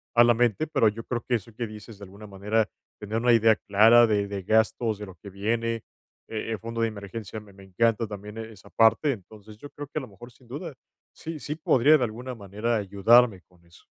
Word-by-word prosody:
a 120 - +7
la 120 - +5
mente, 120 +4 +1
pero 115 -7 +2
yo 115 +2 -8
creo 120 -2 -3
que 125 - +2
eso 115 0 -6
que 115 +1 -4
dices 105 0 -11
de - - -11
alguna 100 +3 -13
manera, 105 +2 -1 0.3
tener 105 +2 -4
una 120 +1 +3
idea 115 -1 +5
clara 110 +4 +5
de 105 -2 0
de 100 -2 -5
gastos, 110 +1 +1
de 105 - -6
lo 95 - -12
que 95 +4 -12
viene, 115 +4 -1 0.5
eh 110 0 -4
e - - -3
fondo 115 +1 -5
de 115 - +2
emergencia, 105 +1 -8
me 105 -1 -17
me 95 0 -15
encanta 115 +4 +1
también 105 +1 -9
e 115 0 -7
esa 100 - -17
parte. 115 +6 +3
Entonces 105 0 -13
yo 145 +6 -11
creo 145 -1 -8
que 155 - -4
a - - -7
lo 130 - -9
mejor, 120 +5 -13
sin 125 0 -23
duda, 145 +4 -6 0.4
sí, 160 -1 -7
sí 150 +1 -5
podría 155 -1 +4
de 130 - -1
alguna 125 +3 -7
manera 105 +3 -3
ayudarme 105 +1 +3
con 90 -1 -27
eso. 85 0 -21
110 Hz, 230 wpm, -26 LUFS, 100-120 Hz, 0.5 s, a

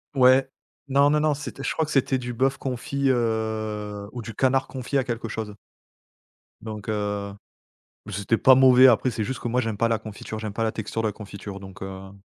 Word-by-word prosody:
Ouais, 130 +1 +5 0.4
non 140 +2 +4
non 150 - +3
non, 150 -1 +2
c'était 140 -1 -7
je - - -1
crois 160 - 0
que 150 - -8
c'était 135 -1 +2
du 125 -1 -5
bœuf 135 +3 +1
confit, 135 +2 -2
heu, 110 -3 -2
ou 120 -3 -6
du 115 - -7
canard 135 0 +2
confit 130 +1 -3
à 130 - +2
quelque 120 -2 -4
chose 110 -2 -5 1.1
donc 110 -1 -7
heu, 105 -1 -2 0.7
beh 105 - -8
c'était 100 +3 0
pas 130 -1 +7
mauvais. 130 0 +7
Après, 125 +1 +4
c'est 110 -1 -2
juste 130 +4 -4
que 120 - -4
moi, 125 +2 +1
j'aime 110 -3 -3
pas 115 - +2
la 115 -1 0
confiture, 110 0 -7
j'aime 105 -2 -5
pas 115 - -1
la 110 - +1
texture 110 +1 -4
de 110 - 0
la 105 - -3
confiture, 100 -1 -8
donc 95 -1 -12
heu, 95 0 -7
115 Hz, 215 wpm, -25 LUFS, 105-130 Hz, 1.1 s, pas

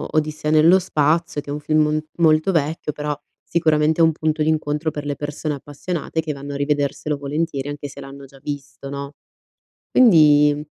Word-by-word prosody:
Odissea 155 0 0
nello 160 +4 +6
spazio 160 -3 0
che 145 - -13
è - - -2
un 150 - -4
film 155 +1 +2
m 155 - 0 0.2
molto 155 +2 +4
vecchio, 155 -2 -1
però, 150 -1 -4 0.2
sicuramente, 155 -1 +1
è - - +7
un 160 - +5
punto 155 0 -1
d'incontro 155 0 0
per 145 0 -6
le 145 - -2
persone 150 +1 -4
appassionate 155 +3 -4
che 155 -1 -4
vanno 140 0 -7
a - - -3
rivederselo 145 +1 -1
volentieri 145 0 -3
anche 145 0 -6
se 140 - -12
l'hanno 135 0 -10
già 135 0 -17
visto, 140 -1 -7
no? 140 0 -6 0.8
Quindi 150 -9 +5
150 Hz, 180 wpm, -21 LUFS, 145-155 Hz, 0.8 s, è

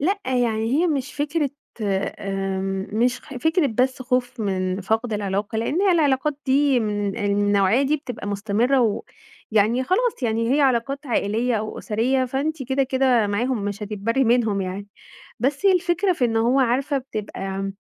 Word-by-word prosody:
لأ 390 +8 +1
يعني 235 -2 0
هي 350 +3 +3
مش 285 -3 -2
فكرة 295 0 -1 0.3
آمم 195 -1 -2
مش 245 +3 +1
خ 290 - -13
مش 245 - -8
فكرة 320 -1 +3
بس 255 +2 0
خوف 250 -1 -1
من 185 -1 -1
فقد 220 +4 -1
العلاقة، 205 +1 -2
لإن 300 - 0
هي 390 - +4
العلاقات 295 -2 +2
دي 270 -1 +3
من 205 -2 -2
النوعية 205 +3 +2
دي 295 +3 +2
بتبقى 245 -8 -7
مستمرة 220 +6 +1
و 220 -4 +1 0.5
ويعني 225 +5 +3
خلاص 435 - 0
يعني 230 +2 +1
هي - - +2
علاقات 275 +2 +1
عائلية 230 +1 0
أو 215 0 -3
أُسرية، 255 +5 0
فأنتِ 275 +3 -2
كده 265 +2 0
كده 260 -4 +2
معاهم 215 +1 -1
مش 205 +1 -4
هتتبرّي 215 +5 0
منهم 225 -4 +2
يعني. 190 +2 -4 0.5
بس 280 +9 0
هي 385 - +7
الفكرة 360 +1 +1
في 265 -7 0
إن 225 -1 0
هو 245 +4 +3
عارفة 265 +3 +1
بتبقى 195 -5 -5
245 Hz, 165 wpm, -23 LUFS, 205-275 Hz, 0.5 s, هي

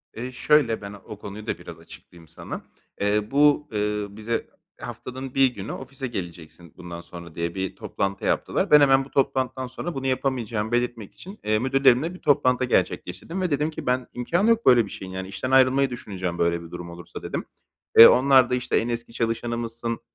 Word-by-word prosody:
Eee, 125 +3 -5
şöyle, 125 -4 +2
ben 100 0 -7
o 100 0 -11
konuyu 105 +1 -9
da - - -2
biraz - - -11
açıklayayım 85 -2 -15
sana. - - -8 0.4
Eee, 105 +2 0
bu, 150 +1 +4
ııı, 105 -1 -2
bize 115 +2 -3 0.3
haftanın 130 +1 -7
1 135 -1 +6
günü 110 -5 -6
ofise 135 0 -6
geleceksin 85 -5 -8
bundan 85 -1 -8
sonra 85 -2 -11
diye 85 0 -3
bir 95 0 -3
toplantı 100 0 -3
yaptılar. - - 0
Ben 150 - +9
hemen 135 -1 +5
bu 135 - -15
toplantıdan 130 -1 0
sonra 160 +6 -6
bunu 135 0 -3
yapamayacağımı 120 -4 -1
belirtmek 120 -3 -2
için, 195 +3 -12
eee, 110 0 +1
müdürlerimle 135 +5 +3
bir 185 - -11
toplantı 130 -3 +2
gerçekleştirdim 165 +7 -1
ve 180 -4 -1
dedim 150 +2 +1
ki - - -8
ben 125 0 0
imkânı 170 - +1
yok 230 0 +2
böyle 120 -3 +6
bir 100 - -11
şeyin. 95 -1 -8
Yani, 95 0 -5
işten 130 +6 -4
ayrılmayı 135 +1 +4
düşüneceğim 95 -7 -5
böyle 85 0 0
bir 85 - -12
durum 85 -1 -7
olursa, 85 0 -10
dedim. - - -4 0.5
Eee, 115 - +13
onlar 130 -1 +5
da, 125 - +1
işte, 125 - 0
"En 115 - 0
eski 115 0 -4
çalışanımızsın, 115 0 -3
120 Hz, 190 wpm, -24 LUFS, 100-135 Hz, 0.5 s, Eee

